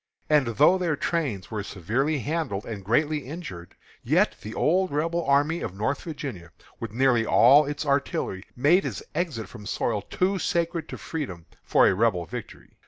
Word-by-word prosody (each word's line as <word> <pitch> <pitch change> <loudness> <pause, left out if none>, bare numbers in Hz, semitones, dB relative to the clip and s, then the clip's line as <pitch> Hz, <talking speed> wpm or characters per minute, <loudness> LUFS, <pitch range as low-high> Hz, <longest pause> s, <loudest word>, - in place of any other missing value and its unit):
And 145 -4 +4
though 150 - +4
their 170 -4 0
trains 140 - -2
were 105 -2 -2
severely 115 - -1
handled 145 -9 -2
and 105 -4 -6
greatly 150 +9 +1
injured, 130 - -8 0.3
yet - - +2
the 110 - -7
old 185 +4 +2
Rebel 165 +4 -1
army 145 +4 +2
of 90 - -5
Northern 110 +8 -2
Virginia, 135 - -6 0.3
with - - -5
nearly 120 0 +3
all 140 +6 +6
its 145 +1 -3
artillery, 140 -9 -1
made 155 +10 +4
its - - -4
exit 150 -11 -2
from 105 -4 -11
soil 110 -3 -1
too 190 - -1
sacred 170 -1 -1
to - - -6
freedom 95 - -5 0.2
for - - +4
a - - +4
Rebel 95 -4 +1
victory. - - -9
140 Hz, 170 wpm, -26 LUFS, 105-160 Hz, 0.3 s, all